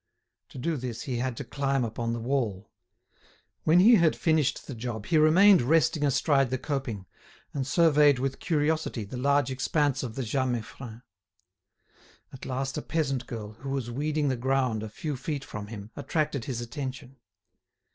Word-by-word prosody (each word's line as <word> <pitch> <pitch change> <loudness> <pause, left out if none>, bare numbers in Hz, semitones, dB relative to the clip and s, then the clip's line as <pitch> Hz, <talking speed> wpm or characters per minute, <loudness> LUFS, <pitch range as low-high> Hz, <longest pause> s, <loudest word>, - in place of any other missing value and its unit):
To - - -12
do 155 +5 -1
this 120 -2 -5
he 130 -3 -3
had 125 -1 -2
to - - -4
climb 135 +1 -1
upon 115 +1 -3
the 120 - -2
wall. 115 -5 -2 0.9
When 165 +3 +5
he 225 +5 +7
had 165 -2 +3
finished 155 -5 +1
the 140 - -7
job 115 -3 -5
he 160 -2 +3
remained 180 +5 +6
resting 155 +3 +2
astride 140 -1 +2
the 130 - -1
coping, 130 -8 -4 0.5
and 135 -2 -2
surveyed 150 -3 +5
with 135 +1 -2
curiosity 155 -6 0
the 105 +5 -7
large 140 0 +2
expanse 140 +1 0
of 120 -4 -5
the 135 - -2
Jas 130 +3 0
Meiffren. 120 0 -5 1.3
At 135 - -9
last 135 +2 -2
a - - -5
peasant 135 -7 -2
girl, 110 -3 -6
who 135 - -6
was 135 -3 -3
weeding 150 +3 0
the 130 - 0
ground 130 -3 0
a 110 - -5
few 145 +7 -4
feet 135 +1 -4
from 105 -4 -7
him, 105 0 -9
attracted 150 -5 -2
his 125 -4 -3
attention. 130 +1 -6
135 Hz, 170 wpm, -27 LUFS, 120-150 Hz, 1.3 s, he